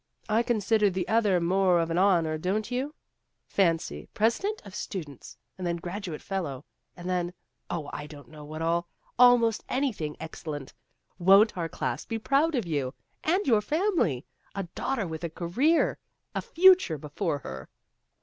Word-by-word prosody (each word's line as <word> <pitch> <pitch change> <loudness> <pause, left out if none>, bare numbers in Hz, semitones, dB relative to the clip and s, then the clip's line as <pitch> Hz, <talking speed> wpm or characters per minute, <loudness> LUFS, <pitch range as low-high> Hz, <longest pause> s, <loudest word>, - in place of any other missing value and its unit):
I 220 +1 +3
consider 220 -2 +2
the 185 -1 -2
other 210 -5 +3
more 180 +1 +3
of 165 0 0
an 170 - +1
honor, 170 -5 +3
don't 210 +7 -1
you? 270 +5 -2 0.5
Fancy 165 - 0
president 375 - +1
of 200 - -11
Stu 190 -2 -4
dents', 140 -4 -13 0.2
and 180 - -2
then 170 - 0
graduate 175 -1 -6
fellow, 160 -9 -4 0.3
and 175 0 -7
then 180 -1 -1 0.4
oh, 155 -4 -3
I 150 - -5
don't 145 -2 -12
know 155 -1 -11
what 155 +2 -6
all 170 +1 +1 0.3
almost 245 -3 +5
any 265 -1 +1
thing 155 -6 -5
excellent. 150 -3 -6 0.5
Won't 195 +5 +6
our 170 -2 -2
class 125 -2 -3
be 225 - -3
proud 285 +7 +2
of 240 -6 0
you! 145 -5 -2 0.3
And 365 +6 +2
your 225 -6 +4
family! 310 - 0 0.3
A 195 - -2
daughter 265 -7 -1
with 160 -1 -6
a 170 - -1
Career 215 - +1 0.3
a - - -1
Future 365 - +5
before 150 +2 -2
her 65 - -8
185 Hz, 165 wpm, -28 LUFS, 160-225 Hz, 0.5 s, Won't